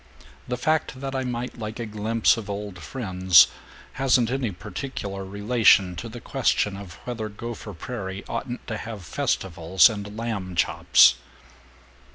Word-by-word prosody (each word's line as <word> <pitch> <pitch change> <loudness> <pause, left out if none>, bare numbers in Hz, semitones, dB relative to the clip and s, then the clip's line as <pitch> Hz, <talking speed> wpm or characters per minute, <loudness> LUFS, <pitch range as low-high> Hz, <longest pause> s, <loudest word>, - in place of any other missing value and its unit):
The 125 - -2
fact 155 -1 0
that 135 0 -4
I 130 - -1
might 125 -1 -4
like 110 +1 -5
a 120 - -3
glimpse 110 +1 +2
of 110 -3 -7
old 100 -2 -5
friends 95 -8 +4 0.5
hasn't 125 -3 +2
any 130 -5 -1
particular 100 0 -6
relation 100 -2 +3
to 115 - -6
the 120 +2 -8
question 115 -6 0
of 95 -2 -9
whether 115 -3 -4
Gopher 110 -1 -7
Prairie 95 -2 -6
oughtn't 120 +1 -5
to 110 - -4
have 105 -4 -7
festivals 85 +3 +2
and 105 0 -7
lamb 105 -6 -4
chops." 65 -5 +5
110 Hz, 145 wpm, -25 LUFS, 95-120 Hz, 0.5 s, chops